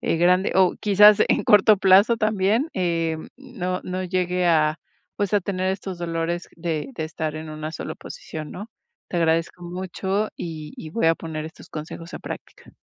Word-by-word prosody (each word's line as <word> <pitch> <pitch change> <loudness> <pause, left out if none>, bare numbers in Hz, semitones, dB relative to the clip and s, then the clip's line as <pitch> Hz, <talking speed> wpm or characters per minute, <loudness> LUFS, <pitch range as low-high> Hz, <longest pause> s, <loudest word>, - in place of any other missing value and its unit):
eh, - - 0
grande 180 +3 +3
o 185 -1 +4
quizás 210 0 +7
en - - +2
corto 210 +1 +6
plazo 195 +4 +5
también, 215 +4 +1
em, 165 -3 -1
no 190 -10 -4
no 185 0 -3
llegue 180 0 0
a, 155 -2 +3 0.4
pues, 205 -1 0
a 205 - +4
tener 185 0 -1
estos 190 -2 -5
dolores 170 0 -2
de 165 - -3
de 160 - -3
estar 155 -1 -4
en 155 0 -7
una 155 +1 -5
sola 155 - -5
posición, 155 -2 -8
¿no?, 205 +5 -8 0.4
te 175 - -2
agradezco 165 +1 +1
mucho 190 +3 -2
y 155 -3 -6
y 155 - -8
voy 170 0 0
a 165 - +5
poner 160 -2 -6
estos 160 - -11
consejos 165 +2 -8
a - - -5
práctica. - - -9
175 Hz, 175 wpm, -23 LUFS, 165-190 Hz, 0.4 s, quizás